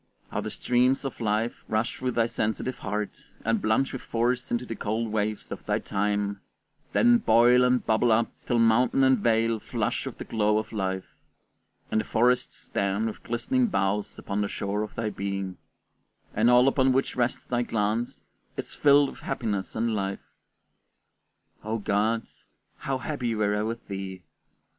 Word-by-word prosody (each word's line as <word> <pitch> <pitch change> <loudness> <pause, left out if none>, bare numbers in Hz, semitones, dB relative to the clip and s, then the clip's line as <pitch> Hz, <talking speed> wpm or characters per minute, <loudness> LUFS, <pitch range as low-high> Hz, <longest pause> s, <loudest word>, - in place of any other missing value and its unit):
How - - -1
the - - -4
streams 125 +3 +1
of 135 - -5
life 110 +2 -1
rush 110 +2 -1
through 130 -1 -1
thy 115 - +3
sensitive 115 +3 -2
heart, 105 +1 -4 0.2
and 115 -1 +1
plunge 110 +5 +1
with 130 - -5
force 120 +2 -1
into 120 +1 0
the 115 - -5
cold 110 +2 -2
waves 105 0 -2
of - - -6
thy - - +2
time, 100 0 -1 0.5
then 240 0 +5
boil 125 - +5
and 125 0 +2
bubble 110 +2 +3
up 115 +1 +2 0.2
till 120 - +2
mountain 115 +4 +4
and 130 -2 +5
vale 115 0 +2
flush - - -2
with - - -7
the - - -5
glow 105 -1 +1
of 110 - -3
life, 95 -3 -2 0.9
and 110 - +2
the - - -6
forests 125 +2 +1
stand 100 +2 -1
with 110 - -4
glistening 240 - 0
boughs 100 - -1
upon 100 +1 -3
the 100 - 0
shore 100 +1 -2
of 105 - -5
thy 110 -2 -2
being, 100 -2 -4 0.7
and 110 +3 +3
all 125 +1 +6
upon 135 -1 +3
which 135 +1 0
rests 125 0 -1
thy 120 -1 0
glance 110 0 -1 0.3
is - - -5
filled 145 -1 +5
with - - -13
happiness 105 -7 -3
and 115 +1 0
life! 100 -2 -4 1.3
O 110 +2 -2
God, 110 +2 +1 0.5
how 135 -1 -2
happy 125 -4 -2
were 105 -1 +1
I 105 - 0
with 115 +2 -4
thee! 95 -2 -6
115 Hz, 170 wpm, -27 LUFS, 105-125 Hz, 1.3 s, all